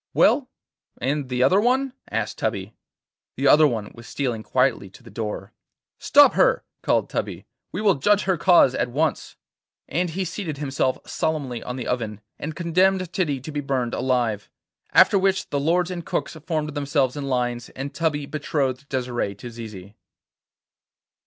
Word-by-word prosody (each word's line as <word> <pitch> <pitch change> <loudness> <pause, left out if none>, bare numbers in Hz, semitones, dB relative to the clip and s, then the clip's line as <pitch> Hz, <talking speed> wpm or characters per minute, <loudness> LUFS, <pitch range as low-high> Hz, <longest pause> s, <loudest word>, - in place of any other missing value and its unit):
'Well, - - +4 0.5
and 140 +1 -1
the 125 0 +1
other 185 +10 +4
one?' 260 +3 +1 0.2
asked - - -3
Tubby. - - -2 0.6
The - - +1
other 155 0 +7
one 110 -5 -3
was 115 +1 -13
stealing 125 -6 -2
quietly 125 -4 +1
to 110 - -17
the 115 - -13
door. 105 -2 -5 0.5
'Stop - - +6
her! - - +3 0.2
called - - +1
Tubby. - - -4 0.3
'We 185 - -3
will 205 -3 +5
judge 205 +9 +2
her 190 -1 +1
cause 170 -6 +5
at 125 - -1
once.' 155 +6 -1 0.5
And 175 +4 -1
he 185 +4 -2
seated 170 -4 -4
himself 135 -2 0
solemnly 140 -7 -2
on 125 - -5
the 125 -3 -5
oven, 110 -4 -2 0.2
and 155 +1 -5
condemned 185 +1 +1
Titty 150 -8 0
to 155 - -7
be 145 -1 -2
burned 130 -4 -1
alive. 120 -5 0 0.4
After 200 - +6
which 190 0 0
the 145 - 0
lords 175 +5 +1
and 175 -2 -5
cooks - - -3
formed 155 -3 -1
themselves 140 -2 0
in 145 -1 -4
lines, 120 -2 -1
and 135 +2 -6
Tubby 150 -2 -1
betrothed 140 -2 -2
Desire 125 -6 -2
to 120 +4 -9
Zizi. 105 -4 -9
140 Hz, 165 wpm, -23 LUFS, 125-165 Hz, 0.6 s, other